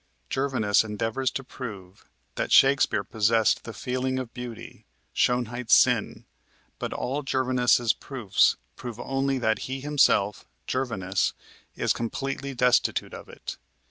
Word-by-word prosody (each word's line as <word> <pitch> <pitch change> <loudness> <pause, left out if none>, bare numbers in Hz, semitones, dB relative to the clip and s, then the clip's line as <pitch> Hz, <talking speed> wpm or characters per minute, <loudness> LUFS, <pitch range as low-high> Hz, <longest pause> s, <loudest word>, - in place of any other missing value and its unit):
Gervinus 130 -7 +2
endeavors 115 +4 -1
to 135 - -5
prove 100 -8 -9 0.3
that - - -3
Shakespeare 135 -6 +5
possessed 110 +1 +2
the 115 - -6
feeling 130 +4 -2
of 130 -3 -5
beauty, 125 -2 -9 0.3
"Schönheit's 120 -1 +2
sinn," - - +2 0.5
but - - -3
all 135 +4 -2
Gervinus's 125 -3 +2
proofs 120 -8 +1 0.2
prove 120 -2 -8
only 135 +2 -1
that 110 -3 +1
he 135 +1 -3
himself, 135 -8 +2 0.2
Gervinus, 105 -7 -1 0.4
is - - +1
completely 135 +3 -4
destitute 125 -1 +2
of - - -10
it. - - -8
125 Hz, 120 wpm, -26 LUFS, 110-135 Hz, 0.5 s, Shakespeare